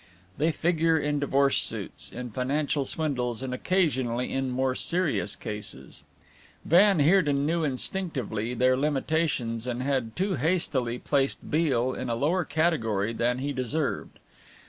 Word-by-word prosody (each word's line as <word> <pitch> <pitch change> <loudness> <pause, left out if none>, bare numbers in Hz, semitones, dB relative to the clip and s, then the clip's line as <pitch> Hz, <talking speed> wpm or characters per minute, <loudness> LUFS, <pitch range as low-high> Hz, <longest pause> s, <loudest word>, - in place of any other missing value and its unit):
They 160 +3 +3
figure 165 0 +2
in 150 -1 0
divorce 140 -1 +2
suits, - - -4
in 125 -1 -6
financial 140 +4 -1
swindles 130 -6 -2
and 130 -1 -3
occasionally 130 -7 0
in 135 -1 -1
more 130 +1 0
serious 170 +4 0
cases. 105 -2 -7 0.6
Van 195 +3 +5
Heerden 145 -3 +3
knew 165 +2 +1
instinctively 130 - -2
their 130 +1 +3
limitations 135 -4 -1
and 125 0 -2
had 130 -5 -1
too 190 -1 0
hastily 130 -6 0
placed 135 +1 -1
Beale 130 -6 +2
in 130 - -4
a 115 - 0
lower 165 +9 +1
category 115 - 0
than 120 +2 0
he 140 +2 -2
deserved. 130 +3 -2
140 Hz, 135 wpm, -27 LUFS, 125-160 Hz, 0.6 s, Van